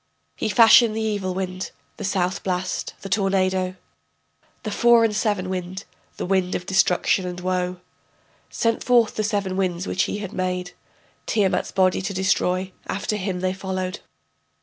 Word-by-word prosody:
He - - -2
fashioned 225 0 +6
the 220 - -1
evil 205 -4 -1
wind, 185 0 -3 0.3
the - - -6
south 185 -1 0
blast, 185 0 -2
the - - -6
tornado, 185 -1 +1 0.9
The 215 - -3
four 235 +2 +5
and 220 -2 +1
seven 205 -4 0
wind, 185 +1 -4 0.3
the - - -3
wind 185 0 +1
of 180 - -4
destruction 190 -1 +2
and 180 0 -5
woe, 180 0 -2 0.7
Sent 230 -1 0
forth 240 -3 +4
the 215 - -1
seven 200 -3 -1
winds 185 -1 -1
which 195 - 0
he - - -3
had 205 -3 -6
made 180 -1 -2 0.6
Tiamat's 195 -4 +1
body 185 -1 +2
to 195 +1 -4
destroy, 185 0 +1 0.2
after 210 +2 -2
him 190 -3 -3
they 185 0 0
followed. 190 0 -4
190 Hz, 155 wpm, -23 LUFS, 185-205 Hz, 0.9 s, fashioned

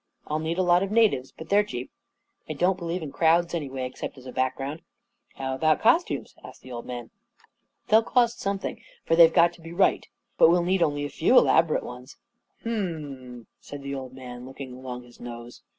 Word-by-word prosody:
I'll 155 +1 -2
need 160 +2 -2
a 185 - +2
lot 175 0 +4
of 195 - -1
natives, 210 - +2
but 160 0 -11
they 200 - +4
are - - +4
cheap. 125 -12 -6 0.6
I - - -2
don't 180 +5 +1
believe 170 0 -3
in 145 - -6
crowds 170 +2 +3
anyway, 135 -6 -3
excep 125 - -6
t - - -13
as 130 - -16
a 130 - -7
background." 130 +4 -2 0.3
" - - -38
How 130 0 -3
about 155 +3 +2
costumes? 330 +10 +2
" - - -29
asked - - -12
the 130 - -11
old 120 -1 -7
man. 120 -2 -7 0.8
"They'll 220 +1 +6
cost 235 0 +1
something 195 -1 -3 0.2
for 165 - +3
they've 165 -1 +8
got 170 0 +4
to 170 - -17
he 165 0 -10
right. 190 +3 +2 0.3
But - - +8
we'll 175 +1 +3
need 185 +1 +1
only 145 -2 +1
a - - -4
few 245 +10 +3
elaborate 160 -1 +4
ones." 125 +3 -10 0.5
44 230 - -2
Hum 210 -4 0
m 150 -3 -7 0.3
m," - - -32
said 145 -1 -9
the 140 0 -4
old 130 -2 -6
man, 125 -2 -9
looking 135 -1 -8
along 125 -1 -7
his 120 -1 -18
nose. 120 0 -9
155 Hz, 225 wpm, -26 LUFS, 130-175 Hz, 0.8 s, they've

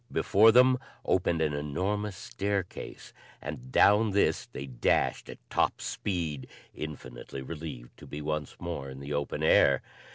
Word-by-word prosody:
Before 110 +3 +5
them 125 +2 +6 0.3
opened 85 -3 +2
an 75 -2 0
enormous 95 +8 -2
staircase 100 0 -4 0.3
and 65 -4 -7
down 105 +5 +5
this 100 - +2
they 70 - -7
dashed 65 -3 0
at - - -8
top - - +1
speed, 85 -8 -3 0.3
infinitely 70 -3 -7
relieved 75 -5 -7
to - - -12
be 75 - -6
once 75 0 -3
more 85 -6 -5
in 65 0 -9
the 70 +1 -5
open 70 0 -2
air. 70 -2 +5
75 Hz, 140 wpm, -29 LUFS, 70-100 Hz, 0.3 s, them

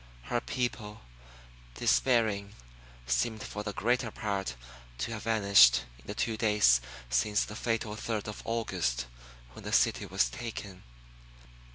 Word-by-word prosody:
Her 120 - -1
people, 110 -4 -3 0.7
despairing, 105 - +2 0.5
seemed 105 - 0
for 105 - -5
the 105 0 -4
greater 120 +3 0
part 100 - -3 0.4
to 60 - -3
have 110 -1 -6
vanished 100 - +6 0.2
in - - -20
the 105 - -5
two 110 0 -1
days 105 - +4 0.3
since 105 - +2
the 105 - -9
fatal 115 -1 -2
third 110 -1 -3
of 105 - -6
August 90 - -1 0.5
when - - -11
the - - -5
city - - +2
was - - +2
taken. 100 - -7
105 Hz, 135 wpm, -30 LUFS, 95-115 Hz, 0.7 s, vanished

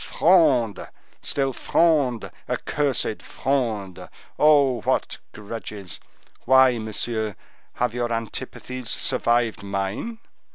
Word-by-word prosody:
Fronde! 145 - +3 0.3
still 135 -2 -1
Fronde! 140 -7 +1 0.2
accursed 140 -7 -1
Fronde! 110 -9 -2 0.3
Oh, 140 -5 +5
what - - -1
grudges! 105 -2 -7 0.5
Why, 130 -1 +5
monsieur, 110 -1 -2 0.4
have 125 -2 -1
your 120 -1 -2
antipathies 125 +1 -4
survived 120 -2 +1
mine? 100 - -3
120 Hz, 85 wpm, -24 LUFS, 110-135 Hz, 0.5 s, Oh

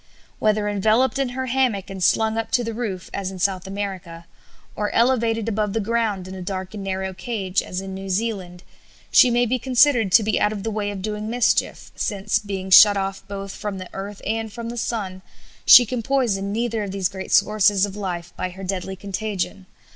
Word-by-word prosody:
Whether 215 -1 +1
enveloped 220 +7 +2
in 270 -2 0
her 260 +1 -4
hammock 250 -6 0
and 190 -1 -5
slung 220 +4 +3
up 225 0 -2
to 245 - +3
the 230 0 -4
roof, 210 -6 -5
as 195 -2 -3
in 190 - -8
South 185 0 -1
America, 190 -4 -6 0.5
or 210 0 -1
elevated 230 -2 +2
above 210 -2 -1
the 225 - 0
ground 215 -3 -1
in 185 - -8
a 190 - -7
dark 185 +1 -5
and 205 -2 -6
narrow 190 0 -3
cage, 190 -1 -2
as 185 +1 -5
in 195 0 -7
New 195 0 -7
Zealand, 185 -3 -3 0.5
she 250 - +7
may 240 0 +2
be 250 +2 0
considered 250 -4 +3
to 225 - +7
be 215 0 0
out 210 - +3
of 205 -2 -5
the 225 - -2
way 210 -1 -2
of 195 -2 -6
doing 210 +1 -4
mischief, 240 0 0
since, 205 -1 -1
being 195 -2 -5
shut 200 +2 +9
off 195 0 -3
both 195 -1 -6
from 205 -1 -5
the 185 -1 -8
earth 200 +1 -7
and 220 0 -2
from 230 +2 -6
the 240 - -6
sun, 200 -6 -3 0.5
she 245 - +10
can 245 +1 -3
poison 220 -6 0
neither 230 0 -1
of 205 - -4
these 190 -1 -1
great 190 0 -8
sources 205 -1 +4
of 200 -1 -8
life 175 -4 -5
by 185 - -3
her 190 +2 -10
deadly 190 0 -3
contagion. 195 -1 -4
205 Hz, 205 wpm, -22 LUFS, 190-225 Hz, 0.5 s, she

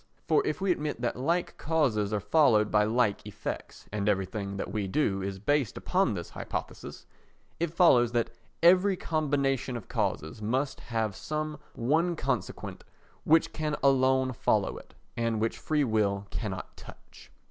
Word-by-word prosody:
For - - +4
if - - -1
we 195 -1 +1
admit 150 -7 -2
that 120 - -1
like 165 +8 -1
causes 130 -10 +1
are 105 - 0
followed 110 - +3
by 105 0 +4
like 110 -2 +1
effects - - -6
(and 105 0 0
everything 100 0 -2
that 95 - -4
we 105 -2 -1
do 95 -3 0
is 95 0 -3
based 135 +4 0
upon 180 - +1
this 85 -2 -6
hypothesis), - - -6 0.5
it 170 -1 0
follows 130 -9 +5
that 115 -1 0 0.3
every 185 +2 +5
combination 140 -6 0
of 115 - -10
causes 80 +7 -2
must 130 +6 -1
have 110 -4 -2
some 155 -1 -4 0.2
one 160 +8 +1
consequent - - -3 0.4
which 160 +1 +4
can 155 -1 -1
alone 130 -1 +3
follow - - +1
it - - -18 0.2
and 115 -2 0
which 115 +1 -1
free 150 -2 +1
will 105 -4 +1
cannot 95 -5 -5
touch. - - -14
125 Hz, 155 wpm, -29 LUFS, 105-155 Hz, 0.5 s, follows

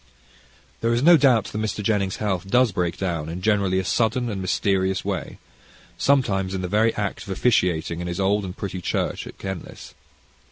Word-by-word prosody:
There 115 +1 +1
is 120 - 0
no 175 +2 +8
doubt 130 -7 +4
that - - -6
Mr. 110 -1 -2
Jennings' 100 -3 0
health 95 -3 -2
does 125 +1 +4
break 90 -3 -1
down 85 -5 -2
in, 85 +2 -5
generally, 100 -3 +2
a 95 - -1
sudden 120 +4 +1
and 95 -2 -4
mysterious 95 0 0
way, - - -4 0.6
sometimes 95 -9 +1
in 95 - -2
the - - -1
very 110 +4 +3
act 100 -2 -3
of 100 - -10
officiating 90 -6 +1
in 90 - -4
his 85 +2 -4
old 100 +2 +2
and 90 -1 -7
pretty 95 -2 -5
church - - -2
at - - -11
Kenlis. 95 -3 -7
95 Hz, 190 wpm, -23 LUFS, 95-110 Hz, 0.6 s, no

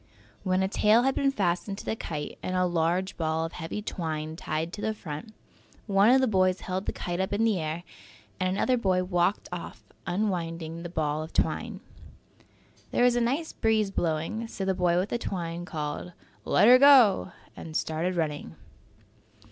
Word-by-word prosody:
When 185 0 +1
a - - +1
tail 215 +4 +4
had 270 +1 +2
been 275 +1 +2
fastened 195 -4 -1
to - - -9
the - - -1
kite 150 -8 -6
and 185 - -3
a 185 0 +2
large 175 +2 0
ball 160 0 0
of 165 - -6
heavy 165 +6 -5
twine 160 -5 -4
tied 160 0 -3
to 210 - -6
the 220 0 -1
front, 155 +2 -7 0.5
one 200 +1 +4
of 265 +1 +6
the 260 - +3
boys 185 -3 +2
held 190 +1 -4
the - - +1
kite 175 0 -4
up 190 +1 -1
in 210 +2 +1
the 220 -5 +2
air 160 +2 -3 0.6
and 185 - +1
another 225 +7 +1
boy 185 -5 +1
walked 180 +2 0
off, 175 -1 -7 0.2
unwinding 170 -4 -2
the 175 - -6
ball 155 -3 -1
of 160 - -8
twine. - - -1 1.1
There - - +1
was 245 -1 +4
a 240 - +2
nice 275 +8 -1
breeze 220 -3 +1
blowing, 170 +7 -2
so 195 -3 -5
the 190 - +1
boy 180 -2 +2
with 185 +3 0
the 240 - -1
twine 175 -4 -4
called, 155 +2 -5 0.3
"Let 205 - +4
'er 250 +1 +9
go" 255 - +6 0.2
and 155 -1 -5
started 165 +4 -1
running. 150 - -3
185 Hz, 185 wpm, -27 LUFS, 165-210 Hz, 1.1 s, er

